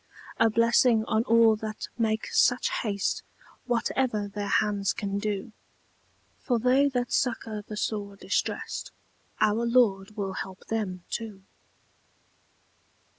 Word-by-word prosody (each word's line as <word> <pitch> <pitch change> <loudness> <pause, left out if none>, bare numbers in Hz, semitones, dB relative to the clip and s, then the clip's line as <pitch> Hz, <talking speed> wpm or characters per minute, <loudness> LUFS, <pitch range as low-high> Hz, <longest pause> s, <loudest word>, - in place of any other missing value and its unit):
A 225 - +5
blessing 230 0 +4
on 220 +1 +1
all 230 -1 +5
that 215 0 -5
make 220 -2 0
such 245 0 +3
haste, 200 -3 -1 0.4
Whatever 235 -3 0
their 205 0 -5
hands 200 -1 +1
can 200 -1 -3
do! 205 0 -3 0.9
For 245 -3 0
they 255 +4 +3
that 245 -2 -2
succour 225 -4 -1
the 210 +1 -8
sore 205 -2 -3
distressed, - - -2 0.5
Our 215 +2 +2
Lord 215 -4 +2
will 195 -2 -2
help 190 +1 -7
them 195 -5 -2
too. 215 -4 -5
215 Hz, 120 wpm, -27 LUFS, 200-230 Hz, 0.9 s, A